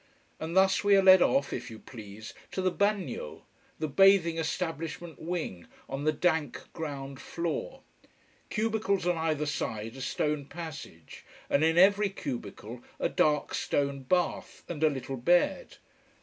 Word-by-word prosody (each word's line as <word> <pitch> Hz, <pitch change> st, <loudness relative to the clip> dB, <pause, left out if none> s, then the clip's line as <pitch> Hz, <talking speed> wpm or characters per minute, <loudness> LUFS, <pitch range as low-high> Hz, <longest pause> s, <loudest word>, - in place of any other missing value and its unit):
And 160 Hz, +2 st, -4 dB
thus 190 Hz, +1 st, +4 dB
we 205 Hz, 0 st, +5 dB
are 195 Hz, -, +5 dB
led 190 Hz, -1 st, +8 dB
off, 140 Hz, -4 st, +2 dB
if -, -, -5 dB
you 110 Hz, -, -9 dB
please, 110 Hz, -2 st, -10 dB, 0.2 s
to 190 Hz, -, -2 dB
the 185 Hz, -, +2 dB
"bagnio": 210 Hz, -, -2 dB, 0.3 s
the 155 Hz, -, -2 dB
bathing 170 Hz, +1 st, +5 dB
establishment 165 Hz, 0 st, -4 dB
wing, 160 Hz, -, -4 dB, 0.2 s
on 135 Hz, +2 st, -4 dB
the 155 Hz, -, +4 dB
dank 160 Hz, -3 st, 0 dB
ground 140 Hz, -4 st, -6 dB
floor. 175 Hz, -, -4 dB, 0.7 s
Cubicles 215 Hz, -4 st, 0 dB
on 175 Hz, 0 st, +2 dB
either 155 Hz, -2 st, 0 dB
side 115 Hz, -5 st, -3 dB
a 135 Hz, -, -8 dB
stone 150 Hz, +2 st, -1 dB
passage, 145 Hz, -, -9 dB, 0.3 s
and 140 Hz, -, +3 dB
in 160 Hz, +1 st, +3 dB
every 200 Hz, +3 st, +5 dB
cubicle 120 Hz, -, -6 dB, 0.2 s
a -, -, +1 dB
dark 150 Hz, -1 st, +1 dB
stone 140 Hz, -1 st, -1 dB
bath, 175 Hz, +7 st, -1 dB
and 160 Hz, -3 st, -4 dB
a 155 Hz, -, +6 dB
little 135 Hz, -1 st, -5 dB
bed. 175 Hz, -, +2 dB
160 Hz, 150 wpm, -29 LUFS, 140-185 Hz, 0.7 s, led